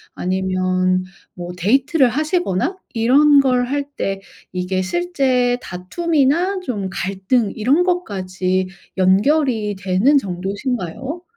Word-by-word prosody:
아니면 185 0 0 0.3
뭐 175 0 -7
데이트를 270 - +3
하시거나 310 - -1 0.2
이런 280 +5 +5
걸 250 -2 +2
할 285 +1 -1
때 195 0 -2 0.3
이게 185 +1 -1
실제 255 - 0
다툼이나 330 - 0
좀 210 - -3
갈등 195 +4 -1
이런 270 +11 +2
것까지 185 - -1 0.3
연결이 210 +2 +2
되는 195 +9 +2
정도신가요? 205 - -4
230 Hz, 225 characters per minute, -19 LUFS, 185-285 Hz, 0.3 s, 이런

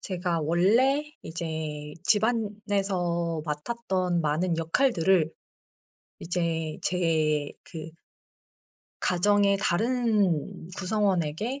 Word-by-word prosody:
제가 175 -3 -2
원래 220 - +3 0.2
이제 155 -3 -5
집안에서 200 -7 0
맡았던 180 +2 -1
많은 160 +3 0
역할들을 170 - +2 0.9
이제 165 -2 -2
제 155 -4 +1
그 160 -1 -8 1.1
가정의 200 +2 +3
다른 210 - +1
구성원에게 200 - 0
175 Hz, 170 characters per minute, -27 LUFS, 160-205 Hz, 1.1 s, 원래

